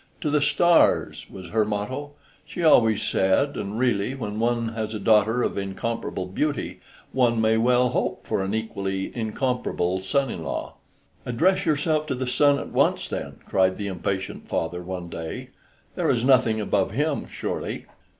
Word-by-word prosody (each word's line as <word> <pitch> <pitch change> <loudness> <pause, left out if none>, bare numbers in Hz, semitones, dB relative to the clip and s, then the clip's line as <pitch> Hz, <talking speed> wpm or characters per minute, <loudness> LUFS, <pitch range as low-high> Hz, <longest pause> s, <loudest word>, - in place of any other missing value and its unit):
To 150 - -1
the 150 0 +3
stars! 175 +3 +3
was 95 -3 -10
her 110 +2 +2
motto, 125 +8 -4 0.3
she 175 - -6
always 115 -9 +5
said, 95 +10 +2
and 100 +2 -4
really, 120 -1 +1
when 110 -5 -4
one 115 0 +1
has 110 -1 -4
a - - -3
daughter 110 +3 +3
of - - -1
incomparable 100 0 -3
beauty, 145 +11 -2 0.3
one 120 -3 +2
may 110 0 +3
well 125 +2 +3
hope - - -2
for - - -1
an 95 +3 -2
equally 100 -3 -3
incomparable 110 -6 -1
son 130 +8 0
in - - -6
law. - - -4 0.5
"Address 165 +12 +1
yourself 155 0 +1
to 135 - -1
the 130 +1 -3
sun 140 +3 +3
at - - -6
once, - - +2
then," - - -5
cried 95 -1 +2
the 105 - -4
impatient 95 0 -3
father 90 +2 -2
one 90 -1 -6
day; 80 -1 -6 0.4
"there - - 0
is 120 0 +1
nothing 120 -5 +4
above 100 -2 +1
him, 145 +10 -1
surely." - - -4
110 Hz, 165 wpm, -24 LUFS, 100-130 Hz, 0.5 s, always